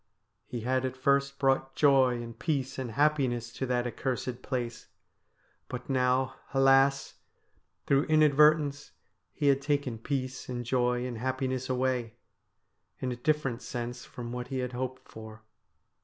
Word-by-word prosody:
He 120 -2 -5
had 130 +2 0
at 130 0 -3
first 140 +1 +1
brought 135 -1 +1
joy 130 -4 +4
and 115 -1 -10
peace 135 -5 -2
and 120 -4 -4
happiness 130 -5 +1
to 130 - -3
that 125 -1 0
accursed 125 0 -3
place; 120 -3 -4 0.8
but 125 +2 -6
now, 130 0 +1 0.2
alas! 135 +1 +4 0.7
through 140 +1 +3
inadvertence 150 -1 +4 0.4
he 145 - -3
had 140 -1 +4
taken 140 -5 -1
peace 130 +1 -3
and 120 -1 -4
joy 125 0 +1
and 125 -2 -4
happi 130 +1 -1
ness 130 0 -3
away, 125 -3 -1 0.8
in 130 - -2
a - - -3
different 135 -2 0
sense 120 0 -5
from 120 -1 -8
what 125 0 -5
he 135 - -4
had 125 -1 -2
hoped 130 +1 -5
for. 110 0 -11
130 Hz, 145 wpm, -29 LUFS, 125-135 Hz, 0.8 s, joy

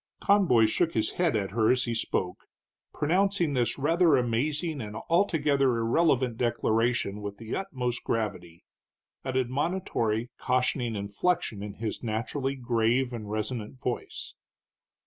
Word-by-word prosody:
Conboy 185 - +4
shook 165 +10 +1
his 110 -1 +1
head 175 -7 +1
at 100 -3 -1
her 110 +1 +2
as 125 -1 +3
he 120 - -2
spoke, 95 -5 -2 0.4
pronouncing 180 0 +1
this 120 -4 +1
rather 165 +2 +4
amazing 140 +6 -1
and 105 -1 -6
altogether 145 -8 +2
irrelevant 125 0 +2
declaration 115 -3 0
with 100 0 -6
the 115 +1 -5
utmost 125 -10 -3
gravity, 95 -7 -3 0.6
an 130 -1 -2
admonitory, 130 - -1
cautioning 125 -2 0
inflection 105 - -1
in 105 0 -6
his 110 -1 -4
naturally 130 +5 -2
grave 120 0 +1
and 110 -3 -6
resonant 110 +3 -4
voice. 125 -2 -4
120 Hz, 125 wpm, -28 LUFS, 110-145 Hz, 0.6 s, Conboy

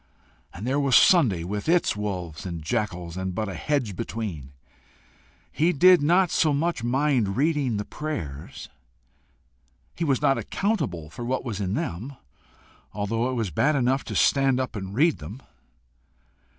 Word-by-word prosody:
And 95 +5 -8
there 135 +3 +1
was 140 -4 +2
Sunday 110 - +5
with 105 - -4
its 175 -8 +3
wolves 90 -6 -4
and 85 -4 -6
jackals, 90 -3 -3
and 95 -1 -3
but 110 +2 -2
a 95 - -5
hedge 125 - -1
between! 90 -12 -5 1.0
He 165 +4 +2
did 180 +3 +6
not 175 +4 +3
so 155 -2 +2
much 160 -3 -1
mind 125 -5 +1
reading 140 -6 +1
the 105 - -3
prayers: 80 - -6 1.3
he 170 - -4
was 140 -5 +1
not 135 - +2
accountable 125 - -2
for 120 - -7
what 130 +2 -2
was 105 -4 -4
in 95 +1 -1
them, 110 +12 -4 0.8
although 115 +4 -1
it 130 - -2
was 110 -6 -2
bad 150 - +2
enough 130 +1 +1
to - - -5
stand 135 -2 +3
up 130 -2 -3
and 95 -1 -6
read 155 - +3
them. 95 - -8
120 Hz, 155 wpm, -25 LUFS, 95-145 Hz, 1.3 s, did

